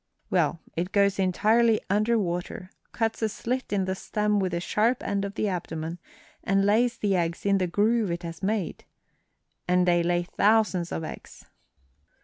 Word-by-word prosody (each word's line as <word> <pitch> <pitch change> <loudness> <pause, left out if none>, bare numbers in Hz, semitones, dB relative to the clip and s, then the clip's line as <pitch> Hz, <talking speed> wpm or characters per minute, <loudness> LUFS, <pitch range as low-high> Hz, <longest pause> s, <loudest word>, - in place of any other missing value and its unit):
Well, 170 - +1 0.2
it 180 +3 -2
goes 200 -1 +2
entirely 215 +4 +3
under 215 +4 +2
water, 180 -1 -3 0.2
cuts 225 -1 -1
a 220 - +1
slit 250 +4 -3
in 195 -2 +1
the 190 - -1
stem 210 +2 -1
with 190 -2 -1
the 170 - -1
sharp 225 +7 +1
end 200 -1 -1
of 200 +1 -5
the 215 - 0
abdomen, 165 -2 -4 0.4
and 195 +1 +2
lays 230 +4 +2
the 205 -4 +1
eggs 170 0 -2
in 200 -1 +3
the 185 - 0
groove 210 +3 +1
it 170 +1 -3
has 165 -1 -7
made. 200 -2 -2 0.8
And 180 0 +3
they 175 -1 +4
lay 175 0 +1
thousands 200 -2 +2
of 160 - -3
eggs." - - -9
195 Hz, 170 wpm, -26 LUFS, 175-215 Hz, 0.8 s, they